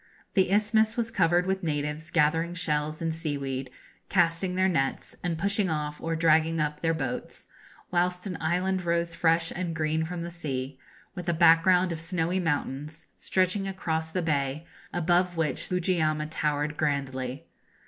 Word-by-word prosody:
This 190 Hz, -2 st, +3 dB
isthmus 215 Hz, +2 st, +3 dB
was 230 Hz, -1 st, 0 dB
covered 175 Hz, -3 st, +3 dB
with 190 Hz, 0 st, -1 dB
natives 150 Hz, 0 st, -2 dB
gathering 165 Hz, +2 st, +2 dB
shells 155 Hz, -2 st, -1 dB
and 165 Hz, -1 st, 0 dB
seaweed, 140 Hz, -5 st, -3 dB, 0.4 s
casting 175 Hz, 0 st, +2 dB
their 185 Hz, 0 st, +3 dB
nets, 135 Hz, -7 st, -1 dB
and 170 Hz, -2 st, -1 dB
pushing 200 Hz, +2 st, +1 dB
off 150 Hz, -1 st, -3 dB
or 165 Hz, 0 st, -1 dB
dragging 160 Hz, 0 st, +3 dB
up 150 Hz, 0 st, -1 dB
their 165 Hz, 0 st, +1 dB
boats; 135 Hz, -5 st, -4 dB, 0.5 s
whilst 180 Hz, +1 st, 0 dB
an 185 Hz, -3 st, -3 dB
island 180 Hz, +3 st, 0 dB
rose 170 Hz, 0 st, 0 dB
fresh 165 Hz, 0 st, +2 dB
and 175 Hz, -2 st, -3 dB
green 160 Hz, 0 st, 0 dB
from 175 Hz, +1 st, -4 dB
the 170 Hz, -, -5 dB
sea, 135 Hz, -5 st, -4 dB, 0.3 s
with 180 Hz, -3 st, -5 dB
a -, -, +3 dB
background 170 Hz, +2 st, +5 dB
of 165 Hz, -1 st, -4 dB
snowy 175 Hz, +1 st, 0 dB
mountains, 155 Hz, -1 st, -2 dB
stretching 190 Hz, +1 st, 0 dB
across 160 Hz, -4 st, -2 dB
the 180 Hz, +2 st, -2 dB
bay, 145 Hz, 0 st, -1 dB, 0.3 s
above 175 Hz, +1 st, +1 dB
which 160 Hz, -3 st, 0 dB
Fujiyama 165 Hz, -4 st, +1 dB
towered 150 Hz, -1 st, -1 dB
grandly. 140 Hz, -1 st, -2 dB
165 Hz, 155 wpm, -27 LUFS, 150-180 Hz, 0.5 s, background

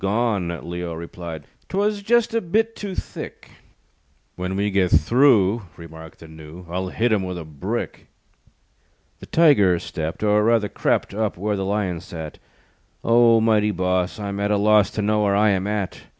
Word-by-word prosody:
"Gone," 100 Hz, -4 st, -1 dB
Leo 85 Hz, -1 st, -5 dB
replied, 85 Hz, -1 st, -8 dB, 0.3 s
"'Twas 205 Hz, +1 st, 0 dB
just 235 Hz, +2 st, +2 dB
a 230 Hz, -, +1 dB
bit 220 Hz, +6 st, 0 dB
too 200 Hz, -3 st, -6 dB
thick." -, -, -8 dB, 0.8 s
"When 90 Hz, +1 st, -4 dB
we 100 Hz, +1 st, 0 dB
get 95 Hz, -2 st, +2 dB
through," 115 Hz, -4 st, +4 dB, 0.2 s
Remarked 80 Hz, -1 st, -12 dB
the 80 Hz, -, -11 dB
Gnu, 80 Hz, +3 st, -12 dB
"I'll 90 Hz, +2 st, -3 dB
hit 115 Hz, +5 st, 0 dB
him 105 Hz, -3 st, +2 dB
with 90 Hz, -1 st, -4 dB
a 85 Hz, -, -7 dB
brick." 75 Hz, -3 st, -5 dB, 1.1 s
The -, -, -11 dB
Tiger 130 Hz, -, +4 dB
stepped, 80 Hz, +1 st, -5 dB
Or, 105 Hz, 0 st, +3 dB
rather, 115 Hz, -2 st, +2 dB
crept, -, -, -1 dB
Up 110 Hz, -2 st, -2 dB
where 105 Hz, +3 st, -1 dB
the 95 Hz, -1 st, -3 dB
Lion 95 Hz, -4 st, -1 dB
sat. 80 Hz, -4 st, -8 dB, 0.6 s
"O, 115 Hz, 0 st, +5 dB
mighty 110 Hz, -1 st, +2 dB
boss 90 Hz, 0 st, -1 dB
I'm 100 Hz, -1 st, -4 dB
at 100 Hz, 0 st, 0 dB
a 105 Hz, -, +2 dB
loss 105 Hz, -1 st, +4 dB
To 105 Hz, -, -3 dB
know 105 Hz, +1 st, +1 dB
where 100 Hz, -1 st, +2 dB
I 105 Hz, +1 st, +4 dB
am 95 Hz, 0 st, -1 dB
at. 105 Hz, -3 st, -3 dB
100 Hz, 170 wpm, -22 LUFS, 90-110 Hz, 1.1 s, O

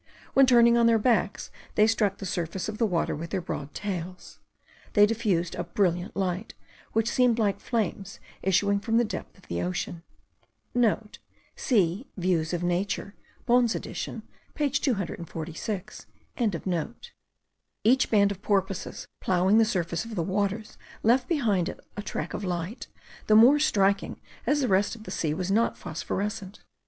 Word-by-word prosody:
When 270 Hz, -1 st, +6 dB
turning 235 Hz, -1 st, +6 dB
on 230 Hz, -, +5 dB
their 230 Hz, -1 st, +5 dB
backs, 220 Hz, -2 st, +1 dB, 0.2 s
they 210 Hz, -, +6 dB
struck 215 Hz, -3 st, +1 dB
the 195 Hz, -, -7 dB
surface 175 Hz, 0 st, -3 dB
of 215 Hz, -, -5 dB
the 230 Hz, -, +3 dB
water 175 Hz, -4 st, 0 dB
with 165 Hz, +3 st, -6 dB
their 190 Hz, -, -1 dB
broad 150 Hz, -4 st, -6 dB
tails; 185 Hz, -3 st, -5 dB, 0.5 s
they 205 Hz, -1 st, +7 dB
diffused 205 Hz, -6 st, 0 dB
a -, -, -3 dB
brilliant 175 Hz, +1 st, 0 dB
light, 190 Hz, +2 st, -2 dB, 0.4 s
which 225 Hz, 0 st, +2 dB
seemed 245 Hz, -1 st, +3 dB
like 210 Hz, -4 st, +1 dB
flames 200 Hz, -4 st, -3 dB, 0.2 s
issuing 200 Hz, +2 st, +2 dB
from 225 Hz, +2 st, 0 dB
the 240 Hz, -, +4 dB
depth 215 Hz, -, -6 dB
of 190 Hz, -, -21 dB
the 85 Hz, 0 st, -2 dB
ocean.* 90 Hz, -, -3 dB, 0.9 s
(* 210 Hz, +1 st, -9 dB
See 205 Hz, -, +1 dB
Views 175 Hz, -3 st, +1 dB
of 175 Hz, -1 st, -2 dB
Nature 185 Hz, +3 st, -1 dB, 0.3 s
Bohn's 240 Hz, -2 st, +3 dB
edition -, -, -5 dB, 0.3 s
page 280 Hz, -2 st, 0 dB
246.) 185 Hz, -, -4 dB, 1.8 s
Each 255 Hz, +4 st, +4 dB
band 200 Hz, -2 st, +4 dB
of 195 Hz, -1 st, -7 dB
porpoises, 195 Hz, -2 st, -1 dB
ploughing 190 Hz, +4 st, +3 dB
the 225 Hz, -, +5 dB
surface 175 Hz, -5 st, -1 dB
of 230 Hz, -1 st, -7 dB
the 170 Hz, -, 0 dB
waters, 200 Hz, +3 st, -2 dB, 0.2 s
left 245 Hz, +3 st, +3 dB
behind 210 Hz, -, +1 dB
it -, -, -8 dB, 0.2 s
a 205 Hz, -, -4 dB
track -, -, -4 dB
of -, -, -4 dB
light, 180 Hz, +4 st, -4 dB, 0.4 s
the 215 Hz, -, +5 dB
more 250 Hz, +7 st, +7 dB
striking 200 Hz, -8 st, +1 dB, 0.3 s
as 295 Hz, 0 st, +3 dB
the 260 Hz, -, +1 dB
rest 200 Hz, +2 st, +2 dB
of 220 Hz, -, -12 dB
the -, -, -8 dB
sea 155 Hz, -2 st, -1 dB
was 185 Hz, +2 st, -2 dB
not 225 Hz, +3 st, +2 dB
phosphorescent. 200 Hz, +4 st, -4 dB
200 Hz, 155 wpm, -27 LUFS, 180-225 Hz, 1.8 s, they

